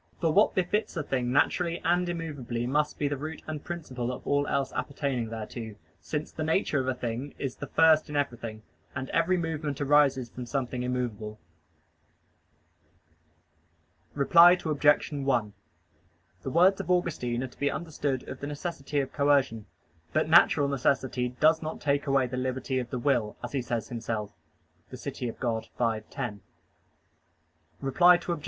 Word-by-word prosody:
For 165 Hz, -2 st, +1 dB
what 210 Hz, +5 st, +4 dB
befits 190 Hz, +1 st, 0 dB
a 155 Hz, -, -1 dB
thing 125 Hz, -3 st, -1 dB
naturally 170 Hz, +5 st, +2 dB
and 175 Hz, +1 st, +2 dB
immovably 145 Hz, -9 st, -4 dB
must 150 Hz, +4 st, 0 dB
be 145 Hz, -, 0 dB
the 145 Hz, 0 st, -2 dB
root 155 Hz, +3 st, -6 dB
and 155 Hz, -2 st, -5 dB
principle 130 Hz, -8 st, -4 dB
of 125 Hz, +1 st, -8 dB
all 145 Hz, 0 st, +1 dB
else 135 Hz, -1 st, -1 dB
appertaining 135 Hz, -5 st, -2 dB
thereto, 110 Hz, 0 st, -6 dB, 0.3 s
since 150 Hz, 0 st, -4 dB
the 155 Hz, -, -4 dB
nature 160 Hz, -2 st, +1 dB
of 130 Hz, -, -2 dB
a 130 Hz, -, 0 dB
thing 125 Hz, +3 st, -4 dB
is 135 Hz, -3 st, -4 dB
the -, -, -7 dB
first 160 Hz, -2 st, +4 dB
in 150 Hz, -, -5 dB
everything, 120 Hz, -6 st, -3 dB, 0.3 s
and 130 Hz, 0 st, -4 dB
every 175 Hz, +3 st, +2 dB
movement 155 Hz, -4 st, -3 dB
arises 140 Hz, -3 st, +3 dB
from 125 Hz, -1 st, -7 dB
something 125 Hz, -1 st, -2 dB
immovable. 120 Hz, -4 st, -3 dB, 2.8 s
Reply 170 Hz, +5 st, +7 dB
Obj. 145 Hz, -1 st, +3 dB
1: 130 Hz, -7 st, 0 dB, 0.9 s
The -, -, -4 dB
words 180 Hz, +6 st, +4 dB
of -, -, -10 dB
Augustine 140 Hz, -9 st, 0 dB
are -, -, -3 dB
to 125 Hz, -, -20 dB
be 145 Hz, -, +2 dB
understood 145 Hz, -6 st, -3 dB
of 130 Hz, -, -7 dB
the 140 Hz, -, -5 dB
necessity 145 Hz, -1 st, -3 dB
of 135 Hz, -, -6 dB
coercion. 135 Hz, -6 st, +2 dB, 0.5 s
But -, -, +2 dB
natural 160 Hz, -3 st, +6 dB
necessity 130 Hz, -2 st, 0 dB
"does 160 Hz, +1 st, +5 dB
not 155 Hz, 0 st, -5 dB
take 145 Hz, 0 st, 0 dB
away 135 Hz, -1 st, +3 dB
the 125 Hz, +1 st, -4 dB
liberty 130 Hz, +1 st, -1 dB
of 120 Hz, -1 st, -5 dB
the 125 Hz, -, -3 dB
will," 120 Hz, -4 st, 0 dB
as -, -, -5 dB
he 140 Hz, -, -1 dB
says 120 Hz, -2 st, -3 dB
himself 110 Hz, -3 st, -4 dB, 0.6 s
(De -, -, -8 dB
Civ. -, -, -5 dB
Dei 125 Hz, -, -2 dB
v, 115 Hz, -1 st, -1 dB
10). 115 Hz, -7 st, -5 dB, 1.4 s
Reply 175 Hz, +6 st, +5 dB
Obj. 170 Hz, -2 st, -1 dB
140 Hz, 160 wpm, -28 LUFS, 125-155 Hz, 2.8 s, Reply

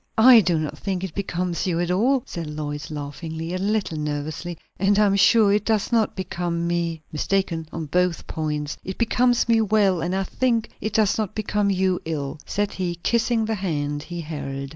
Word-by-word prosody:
"I 240 Hz, +1 st, +9 dB
do 175 Hz, -4 st, +1 dB
not 155 Hz, -1 st, -3 dB
think 190 Hz, -2 st, -2 dB
it 190 Hz, -5 st, -4 dB
becomes 180 Hz, -2 st, -2 dB
you 170 Hz, -2 st, 0 dB
at 175 Hz, 0 st, 0 dB
all," 245 Hz, +7 st, +2 dB
said 170 Hz, -2 st, -6 dB
Lois, 150 Hz, -1 st, -5 dB
laughing 155 Hz, +2 st, -6 dB
a 165 Hz, +3 st, -3 dB
little 200 Hz, -5 st, -1 dB
nervously, 150 Hz, +3 st, -4 dB, 0.2 s
"and 200 Hz, +2 st, +3 dB
I 210 Hz, -, +5 dB
am 200 Hz, -1 st, +3 dB
sure 205 Hz, 0 st, +5 dB
it 205 Hz, 0 st, +2 dB
does 215 Hz, -1 st, 0 dB
not 225 Hz, -2 st, +2 dB
become 175 Hz, -2 st, -2 dB
me." 170 Hz, -2 st, -1 dB
"Mistaken 165 Hz, 0 st, -1 dB
on 165 Hz, -1 st, -4 dB
both 180 Hz, +2 st, 0 dB
points! 150 Hz, -2 st, -3 dB
It 190 Hz, -, -6 dB
becomes 240 Hz, +1 st, +2 dB
me 230 Hz, -1 st, +4 dB
well, 200 Hz, -4 st, +2 dB
and 180 Hz, +3 st, -1 dB
I 195 Hz, -, +1 dB
think 230 Hz, +2 st, 0 dB
it 215 Hz, +1 st, -3 dB
does 215 Hz, -1 st, +2 dB
not 215 Hz, -4 st, -2 dB
become 210 Hz, -1 st, 0 dB
you 190 Hz, -1 st, +1 dB
ill," 150 Hz, -2 st, -3 dB
said 205 Hz, 0 st, -1 dB
he, 180 Hz, -2 st, -3 dB
kissing 235 Hz, -1 st, +2 dB
the 220 Hz, -, -1 dB
hand 145 Hz, -7 st, -2 dB
he 175 Hz, +2 st, -6 dB
held. 140 Hz, -3 st, -5 dB
180 Hz, 195 wpm, -23 LUFS, 160-210 Hz, 0.2 s, I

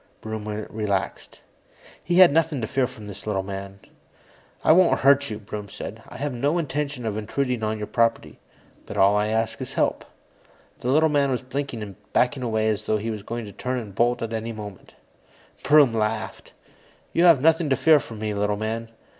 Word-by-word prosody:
Broom 110 Hz, -1 st, -6 dB, 0.2 s
relaxed. 105 Hz, -3 st, -3 dB, 0.6 s
He 175 Hz, -, 0 dB
had 185 Hz, -5 st, +8 dB
nothing 160 Hz, -3 st, +1 dB
to -, -, -1 dB
fear 130 Hz, +3 st, 0 dB
from 110 Hz, -4 st, -12 dB
this 100 Hz, 0 st, -10 dB
little 95 Hz, -3 st, 0 dB
man. 100 Hz, 0 st, -7 dB, 0.8 s
"I -, -, +5 dB
won't 180 Hz, +2 st, +5 dB
hurt 140 Hz, +1 st, +4 dB
you," 105 Hz, -, -4 dB
Broom 105 Hz, -1 st, -7 dB
said. -, -, -8 dB
"I -, -, -9 dB
had 140 Hz, 0 st, -3 dB
no 145 Hz, +7 st, 0 dB
intention 145 Hz, -5 st, -3 dB
of 110 Hz, -1 st, -2 dB
intruding 125 Hz, +3 st, -2 dB
on 110 Hz, 0 st, -1 dB
your 105 Hz, -, -4 dB
property, 115 Hz, +1 st, 0 dB, 0.5 s
but -, -, -6 dB
all 100 Hz, +1 st, +5 dB
I 105 Hz, 0 st, +2 dB
ask 110 Hz, +1 st, -1 dB
is -, -, -5 dB
help." -, -, 0 dB, 0.8 s
The 125 Hz, -, -3 dB
little 155 Hz, +4 st, +4 dB
man 145 Hz, -2 st, +2 dB
was 130 Hz, -1 st, -1 dB
blinking 130 Hz, -3 st, -4 dB
and 100 Hz, -3 st, -9 dB, 0.2 s
backing 125 Hz, +2 st, +2 dB
away, 110 Hz, -3 st, 0 dB
as 105 Hz, -1 st, -1 dB
though 110 Hz, -, +1 dB
he 110 Hz, +2 st, -3 dB
were 105 Hz, -2 st, -5 dB
going 115 Hz, +2 st, -5 dB
to 100 Hz, -, -9 dB
turn 125 Hz, +5 st, -3 dB
and 110 Hz, -5 st, -6 dB
bolt 120 Hz, +3 st, +1 dB
at 115 Hz, 0 st, -4 dB
any 115 Hz, +1 st, -3 dB
moment. 105 Hz, -4 st, -9 dB, 0.7 s
Broom 145 Hz, -5 st, +5 dB
laughed. 110 Hz, -1 st, -3 dB, 0.6 s
"You 170 Hz, -, +4 dB
have 165 Hz, -6 st, +7 dB
nothing 160 Hz, +2 st, +3 dB
to 135 Hz, -, +3 dB
fear 155 Hz, +2 st, +5 dB
from 115 Hz, -5 st, -9 dB
me, 105 Hz, 0 st, -3 dB
little 105 Hz, 0 st, 0 dB
man. 115 Hz, +2 st, -3 dB
115 Hz, 195 wpm, -24 LUFS, 105-140 Hz, 0.8 s, had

